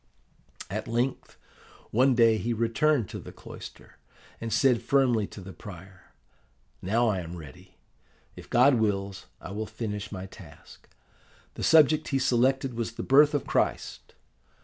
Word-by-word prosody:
"At -, -, -4 dB
length, 120 Hz, +3 st, -2 dB, 0.5 s
one 130 Hz, +3 st, +3 dB
day 115 Hz, -2 st, +4 dB
he 120 Hz, +2 st, -1 dB
returned 115 Hz, +2 st, +1 dB
to -, -, -6 dB
the -, -, -10 dB
cloister, -, -, -12 dB, 0.4 s
and 115 Hz, 0 st, -5 dB
said 125 Hz, -2 st, +3 dB
firmly 125 Hz, -7 st, +2 dB
to 100 Hz, -, -11 dB
the 95 Hz, +1 st, -10 dB
prior, 95 Hz, -2 st, -13 dB, 0.7 s
'Now 115 Hz, +5 st, +1 dB
I 100 Hz, -4 st, 0 dB
am 85 Hz, 0 st, -7 dB
ready. 75 Hz, -5 st, -13 dB, 0.6 s
If -, -, -12 dB
God 125 Hz, +1 st, +4 dB
wills, 100 Hz, -3 st, -2 dB
I -, -, -9 dB
will 105 Hz, +2 st, -4 dB
finish 105 Hz, -2 st, -5 dB
my 95 Hz, -2 st, -6 dB
task.' 90 Hz, -6 st, -15 dB, 0.6 s
The -, -, -8 dB
subject 155 Hz, -1 st, +4 dB
he 135 Hz, -, 0 dB
selected 130 Hz, +1 st, +1 dB
was 115 Hz, -1 st, -4 dB
the -, -, -6 dB
Birth 145 Hz, +3 st, +5 dB
of 145 Hz, -, -1 dB
Christ. -, -, -2 dB
115 Hz, 150 wpm, -27 LUFS, 100-130 Hz, 0.7 s, Birth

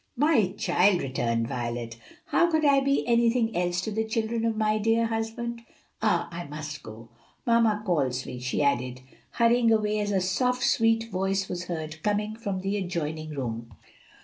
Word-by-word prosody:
"My 240 Hz, -, +3 dB
child," 185 Hz, -1 st, +3 dB
returned 115 Hz, -3 st, -1 dB
Violet, 120 Hz, -1 st, -4 dB, 0.3 s
"how 345 Hz, 0 st, +3 dB
could 315 Hz, -2 st, +2 dB
I 280 Hz, -1 st, +6 dB
be 275 Hz, +1 st, +1 dB
anything 235 Hz, -1 st, +2 dB
else 175 Hz, 0 st, 0 dB
to 215 Hz, -, -4 dB
the 220 Hz, +1 st, 0 dB
children 225 Hz, +1 st, -1 dB
of 225 Hz, -1 st, 0 dB
my 215 Hz, 0 st, +1 dB
dear 225 Hz, +2 st, +2 dB
husband? 230 Hz, +1 st, -3 dB, 0.4 s
Ah, -, -, +2 dB
I 170 Hz, 0 st, -6 dB
must 150 Hz, 0 st, -7 dB
go! 110 Hz, 0 st, -11 dB, 0.4 s
Mamma 230 Hz, -3 st, +3 dB
calls 135 Hz, -8 st, 0 dB
me," 125 Hz, -, -6 dB
she 130 Hz, +3 st, -1 dB
added, 130 Hz, -2 st, 0 dB, 0.3 s
hurrying 235 Hz, 0 st, +4 dB
away 215 Hz, -1 st, +2 dB
as 205 Hz, 0 st, -1 dB
a 195 Hz, -, +2 dB
soft, 250 Hz, +8 st, 0 dB
sweet 225 Hz, 0 st, +2 dB
voice 195 Hz, +1 st, 0 dB
was 180 Hz, 0 st, -4 dB
heard 160 Hz, -2 st, -5 dB
coming 210 Hz, +2 st, -1 dB
from 200 Hz, -4 st, -4 dB
the 195 Hz, +2 st, -1 dB
adjoining 155 Hz, -4 st, -3 dB
room. 115 Hz, -3 st, -4 dB
200 Hz, 170 wpm, -27 LUFS, 150-225 Hz, 0.4 s, I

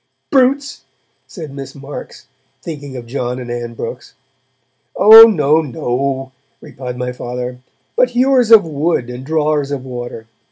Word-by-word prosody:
'Brutes!' 275 Hz, +1 st, +1 dB, 0.5 s
said 160 Hz, -6 st, -9 dB
Miss 135 Hz, -1 st, -9 dB
Marks, 140 Hz, -1 st, -10 dB, 0.4 s
thinking 145 Hz, -5 st, -7 dB
of 120 Hz, -, -8 dB
John 125 Hz, 0 st, -4 dB
and 125 Hz, -2 st, -7 dB
Ann 120 Hz, -1 st, -5 dB
Brooks. 125 Hz, -, -8 dB, 0.8 s
'Oh 220 Hz, +2 st, +10 dB
no! 155 Hz, -5 st, +2 dB
no!' 135 Hz, -1 st, -3 dB, 0.3 s
replied 125 Hz, -1 st, -8 dB
my 125 Hz, 0 st, -3 dB
Father, 125 Hz, 0 st, -6 dB, 0.4 s
'but -, -, +3 dB
hewers 255 Hz, -1 st, +2 dB
of 225 Hz, -5 st, +7 dB
wood 150 Hz, -5 st, -2 dB
and 125 Hz, +1 st, -8 dB
drawers 150 Hz, -1 st, 0 dB
of 140 Hz, -2 st, -5 dB
water! 120 Hz, -3 st, -7 dB
140 Hz, 135 wpm, -16 LUFS, 125-165 Hz, 0.8 s, Oh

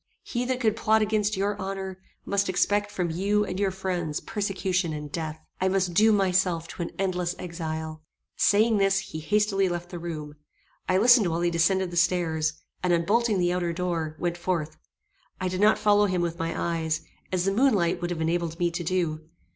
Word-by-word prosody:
He 245 Hz, 0 st, -2 dB
that 255 Hz, 0 st, -1 dB
could 220 Hz, -4 st, +2 dB
plot 220 Hz, -1 st, +3 dB
against 215 Hz, -1 st, 0 dB
your 200 Hz, +2 st, 0 dB
honor, 190 Hz, -1 st, -5 dB, 0.3 s
must 200 Hz, 0 st, 0 dB
expect 205 Hz, +2 st, +1 dB
from 180 Hz, -4 st, -2 dB
you 205 Hz, +5 st, +1 dB
and 185 Hz, -1 st, -4 dB
your 200 Hz, -1 st, +2 dB
friends 180 Hz, -5 st, -3 dB
persecution 190 Hz, -4 st, -1 dB
and 150 Hz, -1 st, -6 dB
death. 160 Hz, -1 st, -4 dB, 0.2 s
I 190 Hz, -, +3 dB
must 190 Hz, -2 st, +1 dB
doom 215 Hz, +4 st, +5 dB
myself 180 Hz, -3 st, +1 dB
to 170 Hz, -2 st, -4 dB
endless 180 Hz, -2 st, -1 dB
exile." 160 Hz, -2 st, -5 dB, 0.3 s
Saying 215 Hz, +2 st, +4 dB
this, 195 Hz, 0 st, +3 dB
he 160 Hz, -4 st, -4 dB
hastily 195 Hz, +2 st, +1 dB
left 175 Hz, 0 st, -5 dB
the 175 Hz, -, -5 dB
room. 155 Hz, -3 st, -6 dB, 0.5 s
I 185 Hz, -, +4 dB
listened 230 Hz, -1 st, +6 dB
while 165 Hz, 0 st, -1 dB
he 175 Hz, 0 st, +1 dB
descended 175 Hz, +2 st, +2 dB
the 175 Hz, -, -4 dB
stairs, 160 Hz, -3 st, +1 dB, 0.3 s
and, 180 Hz, -, +1 dB
unbolting 205 Hz, +6 st, +2 dB
the 175 Hz, -1 st, +2 dB
outer 175 Hz, -2 st, -1 dB
door, 165 Hz, -3 st, -2 dB
went 175 Hz, 0 st, -2 dB
forth. 165 Hz, -3 st, -2 dB, 0.6 s
I 185 Hz, -, -1 dB
did 185 Hz, +1 st, -2 dB
not 215 Hz, +1 st, +5 dB
follow 210 Hz, -1 st, +4 dB
him 180 Hz, -2 st, 0 dB
with 170 Hz, -1 st, -3 dB
my 165 Hz, 0 st, -2 dB
eyes, 165 Hz, -2 st, -1 dB, 0.3 s
as 185 Hz, -1 st, 0 dB
the 195 Hz, -, +2 dB
moon 255 Hz, +2 st, +4 dB
light 170 Hz, -2 st, 0 dB
would 175 Hz, -, -2 dB
have 170 Hz, -2 st, -3 dB
enabled 165 Hz, 0 st, -1 dB
me 175 Hz, 0 st, +1 dB
to 170 Hz, +1 st, -4 dB
do. 160 Hz, -3 st, -2 dB
180 Hz, 195 wpm, -26 LUFS, 170-200 Hz, 0.6 s, listened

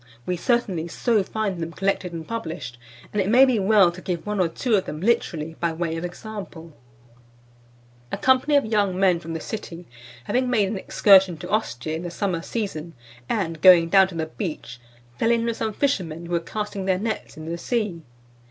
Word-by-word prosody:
We 180 Hz, -, -1 dB
certainly 190 Hz, -5 st, 0 dB
so 220 Hz, +5 st, +1 dB
find 200 Hz, -2 st, -3 dB
them 165 Hz, 0 st, -4 dB
collected 195 Hz, -1 st, -1 dB
and 165 Hz, -2 st, -7 dB
published, 160 Hz, -, -5 dB, 0.3 s
and 210 Hz, -, +1 dB
it 190 Hz, -, -1 dB
may 255 Hz, +4 st, +7 dB
be 255 Hz, -4 st, +2 dB
well 195 Hz, -2 st, +5 dB
to 180 Hz, +2 st, -11 dB
give 175 Hz, -3 st, -4 dB
one 210 Hz, -1 st, -2 dB
or 180 Hz, -, +3 dB
two 230 Hz, +8 st, -2 dB
of 195 Hz, -3 st, +3 dB
them 150 Hz, -, -6 dB
literally, 165 Hz, -6 st, 0 dB
by 170 Hz, -1 st, 0 dB
way 165 Hz, 0 st, -2 dB
of 165 Hz, -, -4 dB
example: 175 Hz, -3 st, -8 dB, 1.4 s
"A -, -, -2 dB
company 260 Hz, +3 st, +3 dB
of 285 Hz, -, +4 dB
young 205 Hz, -4 st, +1 dB
men 185 Hz, -3 st, +3 dB
from 165 Hz, 0 st, -7 dB
the -, -, -3 dB
city, 175 Hz, -3 st, -7 dB, 0.4 s
having 250 Hz, -, 0 dB
made 215 Hz, -5 st, +2 dB
an 210 Hz, -, -3 dB
excursion 190 Hz, -3 st, +5 dB
to -, -, -8 dB
Ostia 155 Hz, -, -1 dB
in 160 Hz, -, -4 dB
the 175 Hz, -, -5 dB
summer 175 Hz, -1 st, -2 dB
season, 170 Hz, -7 st, -4 dB, 0.4 s
and 165 Hz, -7 st, -2 dB
going 170 Hz, -2 st, +7 dB
down 190 Hz, 0 st, +6 dB
to 190 Hz, -, -10 dB
the 160 Hz, -1 st, -1 dB
beach, 160 Hz, -6 st, -6 dB, 0.4 s
fell 225 Hz, -, +2 dB
in 230 Hz, -1 st, +2 dB
with 230 Hz, -1 st, -2 dB
some 220 Hz, -, -1 dB
fishermen 180 Hz, -, -1 dB
who 170 Hz, -, -9 dB
were 170 Hz, -, +2 dB
casting 200 Hz, +4 st, -5 dB
their 190 Hz, -1 st, +2 dB
nets 215 Hz, -3 st, -4 dB
in 155 Hz, -, -8 dB
the 170 Hz, +1 st, -4 dB
sea. 210 Hz, -5 st, -2 dB
185 Hz, 200 wpm, -24 LUFS, 165-215 Hz, 1.4 s, may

